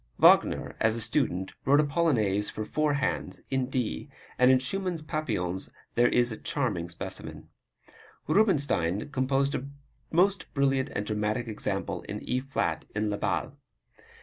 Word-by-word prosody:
Wagner, - - +5
as 110 0 +3
a - - -3
student, 110 -6 0
wrote 140 +3 +5
a - - +5
Polonaise 120 - +1
for 110 - -5
four 150 +4 +1
hands, 135 -2 -2
in 130 -1 +1
D, 120 - -2 0.3
and 125 0 +6
in 130 - +7
Schumann's 175 +4 -2
Papillons 105 - -2 0.2
there 120 0 +4
is 120 0 +2
a 110 - -5
charming 105 - -2
specimen. 85 - -7 0.8
Rubinstein 145 - +2
composed 135 +1 +1
a 135 - -3 0.4
most 190 +4 +2
brilliant 135 -1 +2
and 105 - -1
dramatic 105 +2 -1
example 110 - -3
in - - -3
E 125 - 0
flat 130 -11 -2
in 105 0 0
Le 105 - -1
Bal. 100 - -1
130 Hz, 150 wpm, -28 LUFS, 105-145 Hz, 0.8 s, in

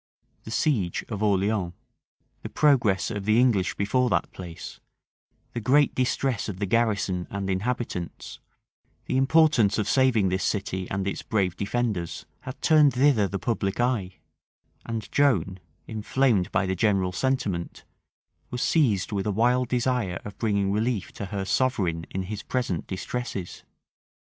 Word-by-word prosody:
The - - -7
siege 110 - 0
of 105 -3 -4
Orleans, 100 -3 +1 0.7
the - - -6
progress 120 -11 +2
of 105 -3 -4
the 110 +2 +4
English 115 -8 +2
before 125 +5 +1
that - - 0
place, 85 -3 -9 0.7
the 120 - -2
great 140 +6 +3
distress 130 -3 0
of 95 - -5
the 100 - -1
garrison 100 -5 0
and 100 -1 -4
inhabitants, 95 -3 -4 0.7
the - - -2
importance 135 -5 +4
of 105 -2 -1
saving 120 -7 +3
this 95 +2 -1
city 95 -3 -2
and 95 0 -2
its 100 - -3
brave 95 -5 0
defenders, 100 -4 -2
had 130 - -8
turned 150 -4 +5
thither 125 -6 +4
the 100 - -3
public 100 -2 -2
eye; 115 -7 0 0.7
and 115 -2 -4
Joan, 95 - +2 0.3
inflamed 110 -2 +1
by - - +1
the 95 - -1
general 95 -2 +1
sentiment, 95 -5 -2 0.7
was 125 0 -3
seized 110 - +2
with 100 -1 -2
a - - +1
wild 125 +4 +2
desire 120 -7 0
of 105 - -7
bringing 100 -3 +1
relief 110 -1 -1
to 100 - -6
her 100 0 -3
sovereign 95 - 0
in 95 - -3
his 100 +2 -5
present 125 -8 -2
distresses. 95 -1 -5
105 Hz, 145 wpm, -26 LUFS, 95-125 Hz, 0.7 s, turned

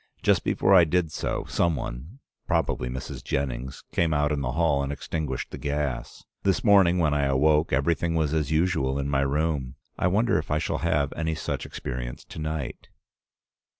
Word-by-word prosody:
Just - - +3
before 95 - +2
I 90 -3 +8
did 85 0 +1
so, - - -3
some 85 -2 +1
one, 70 - -6 0.3
probably 60 - 0
Mrs. 65 +2 -6
Jennings, 65 -1 -3
came 80 -2 +1
out 75 0 +2
in 75 -2 -1
the 60 -2 -2
hall 80 -3 +2
and 70 0 -2
extinguished 70 -2 -4
the - - -7
gas. 70 -3 -3 0.2
This 95 -2 +1
morning 95 -4 +5
when 80 -4 +2
I 70 -1 +1
awoke 75 +4 +3
everything 80 +5 +1
was 80 -2 +1
as 75 -3 0
usual 80 -4 +1
in 70 0 -2
my 70 -1 +2
room. 70 -1 -1 0.2
I - - +2
wonder 105 0 +2
if 75 - -7
I 75 - +2
shall 80 - -1
have 75 -4 0
any 80 0 -2
such - - -4
experience - - -5
to - - -10
night. 75 -2 -4
75 Hz, 185 wpm, -26 LUFS, 70-80 Hz, 0.3 s, I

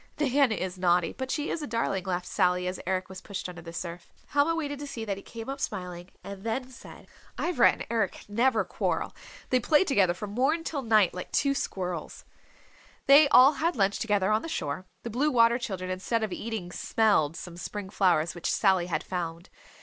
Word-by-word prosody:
"Nan 275 -3 +3
is 185 -3 -3
naughty, 175 -1 +2
but 260 0 -5
she 295 +2 -1
is 330 - -3
a 295 - -4
darling," 220 -5 -1
laughed 180 -1 -2
Sally 180 0 +1
as 180 +1 -3
Eric 185 0 -1
was 190 -1 -9
pushed 200 -3 -5
under 175 -1 -9
the 165 0 -9
surf. 170 0 -7 0.2
Helma 290 +3 +2
waited 290 -3 -3
to 290 - -6
see 230 -5 -5
that 200 -2 -2
he 195 - -10
came 225 +1 -9
up 275 +1 -5
smiling 180 -3 -5
and 200 -1 -8
then 250 +3 -3
said, 250 - -13 0.3
"Ivra 345 -8 +4
and - - -7
Eric 225 -5 -1
never 230 +2 +2
quarrel. - - -2 0.4
They 255 - +4
play 300 +7 +4
together 200 - +2
from 200 +2 -6
morn 275 +9 +1
till 295 -4 -3
night 215 -6 +3
like 180 - -7
two 280 -1 +2
squirrels."... 180 - -4 0.8
They 285 +1 +8
all 270 +3 +8
had 330 +4 0
lunch 200 -3 +1
together 205 -2 +1
on 215 +1 +2
the 330 - -6
shore. 155 - -3 0.2
The 235 - -5
Blue 275 +7 +1
Water 235 -2 +4
Children 185 -6 -4
instead 220 +5 -1
of 215 - -2
eating 215 -6 -5
smelled 180 -8 +1
some 175 -2 -8
spring 195 +2 -6
flowers 175 -5 +2
which 175 - -3
Sally 185 -2 +2
had 180 - -2
found. 170 0 -5
205 Hz, 205 wpm, -28 LUFS, 180-260 Hz, 0.8 s, They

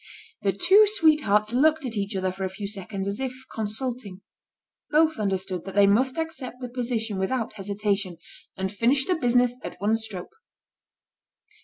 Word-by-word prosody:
The 195 - +2
two 390 - +5
sweethearts 300 - +3
looked 310 +3 +3
at 235 -2 -3
each 200 0 -2
other 185 -1 0
for 190 +1 -6
a 190 - -1
few 200 +2 -6
seconds 195 -1 -5
as 200 +1 -3
if 260 0 -5
consulting. 220 -2 -4 0.7
Both 315 -2 +3
understood 190 -3 -2
that 195 - -7
they 205 0 +6
must 255 +8 +3
accept 320 -6 -4
the 250 -1 -6
position 230 -4 -2
without 230 +4 -1
hesitation, 200 -2 -2 0.4
and 190 0 -2
finish 245 +6 +2
the 370 - +1
business 245 -5 +2
at - - -7
one 210 +3 +2
stroke. 215 -5 -5
220 Hz, 160 wpm, -25 LUFS, 195-260 Hz, 0.7 s, they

